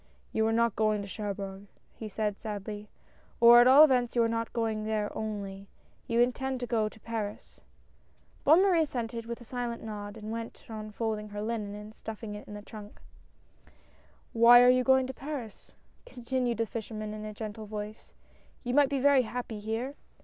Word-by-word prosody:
"You 220 Hz, 0 st, +1 dB
are -, -, +1 dB
not 230 Hz, -1 st, +2 dB
going 215 Hz, -1 st, +1 dB
to -, -, -8 dB
Cherbourg," 200 Hz, -1 st, -5 dB, 0.3 s
he 220 Hz, -, -7 dB
said 210 Hz, 0 st, -2 dB
sadly, 210 Hz, 0 st, -6 dB, 0.3 s
" -, -, -32 dB
or, 235 Hz, +1 st, +9 dB
at 245 Hz, -, +6 dB
all 275 Hz, +4 st, +9 dB
events, 250 Hz, -5 st, +3 dB
you 235 Hz, -, +4 dB
are -, -, +3 dB
not 230 Hz, 0 st, -2 dB
going 225 Hz, -2 st, -1 dB
there 215 Hz, -1 st, -2 dB
only: 200 Hz, -2 st, -5 dB, 0.4 s
you 230 Hz, 0 st, +1 dB
intend 260 Hz, +2 st, 0 dB
to -, -, -1 dB
go 220 Hz, -3 st, 0 dB
to 220 Hz, -, -17 dB
Paris." 215 Hz, -2 st, -6 dB, 0.8 s
Bonne 320 Hz, +6 st, +6 dB
Marie 365 Hz, -4 st, +4 dB
assented 235 Hz, -5 st, -3 dB
with 235 Hz, +1 st, -5 dB
a -, -, -9 dB
silent 240 Hz, -1 st, -4 dB
nod, 205 Hz, -1 st, -6 dB
and 215 Hz, 0 st, -7 dB
went 230 Hz, 0 st, -6 dB
on 215 Hz, -1 st, -7 dB
folding 215 Hz, -1 st, -3 dB
her 205 Hz, 0 st, -5 dB
linen 215 Hz, -2 st, -3 dB
and 210 Hz, +1 st, -10 dB
stuffing 220 Hz, -1 st, -7 dB
it 210 Hz, -, -9 dB
into 210 Hz, 0 st, -8 dB
the -, -, -20 dB
trunk. 210 Hz, -1 st, -11 dB, 0.7 s
" -, -, -31 dB
Why 240 Hz, +1 st, +8 dB
are 250 Hz, -, +7 dB
you 255 Hz, 0 st, +3 dB
going 265 Hz, 0 st, +4 dB
to 260 Hz, -, -5 dB
Paris? 265 Hz, -6 st, -7 dB, 0.2 s
" -, -, -35 dB
continued 245 Hz, -, -2 dB
the 230 Hz, -, +1 dB
flsh 220 Hz, 0 st, -6 dB
erman 215 Hz, -1 st, -5 dB
in 215 Hz, 0 st, -7 dB
a 215 Hz, -, -5 dB
gentle 215 Hz, 0 st, -7 dB
voice; 210 Hz, +1 st, -7 dB, 0.2 s
" -, -, -33 dB
you 245 Hz, -1 st, -2 dB
might 285 Hz, 0 st, +5 dB
be 280 Hz, -, 0 dB
very 280 Hz, 0 st, +5 dB
happy 240 Hz, -2 st, -5 dB
here. 225 Hz, +6 st, -3 dB
225 Hz, 200 wpm, -29 LUFS, 210-245 Hz, 0.8 s, or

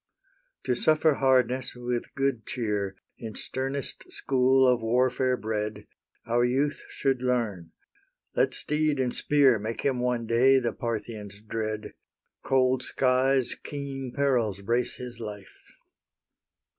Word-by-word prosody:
To 125 Hz, -, +1 dB
suffer 155 Hz, +4 st, +3 dB
hardness 130 Hz, -2 st, +2 dB
with 120 Hz, -1 st, -4 dB
good 135 Hz, -4 st, 0 dB
cheer, 105 Hz, -5 st, -2 dB, 0.2 s
In 110 Hz, -2 st, -7 dB
sternest 135 Hz, +1 st, -4 dB
school 130 Hz, 0 st, +3 dB
of 125 Hz, -2 st, +3 dB
warfare 125 Hz, +2 st, +2 dB
bred, 105 Hz, -1 st, -3 dB, 0.4 s
Our 120 Hz, +1 st, +2 dB
youth 135 Hz, +4 st, 0 dB
should 135 Hz, -3 st, 0 dB
learn; 110 Hz, -10 st, -1 dB, 0.6 s
let -, -, +2 dB
steed 150 Hz, -1 st, 0 dB
and 125 Hz, -2 st, 0 dB
spear 140 Hz, -6 st, +4 dB
Make 110 Hz, +2 st, -4 dB
him 135 Hz, -3 st, 0 dB
one 125 Hz, -1 st, 0 dB
day 125 Hz, +4 st, +5 dB
the 120 Hz, -3 st, -2 dB
Parthian's 110 Hz, -3 st, -5 dB
dread; 110 Hz, 0 st, -4 dB, 0.5 s
Cold 130 Hz, -1 st, +2 dB
skies, 130 Hz, 0 st, +2 dB
keen 135 Hz, -3 st, -6 dB
perils, 120 Hz, -8 st, +1 dB
brace 120 Hz, +4 st, 0 dB
his 125 Hz, -2 st, -8 dB
life. 105 Hz, -3 st, -9 dB
125 Hz, 120 wpm, -27 LUFS, 115-135 Hz, 0.6 s, day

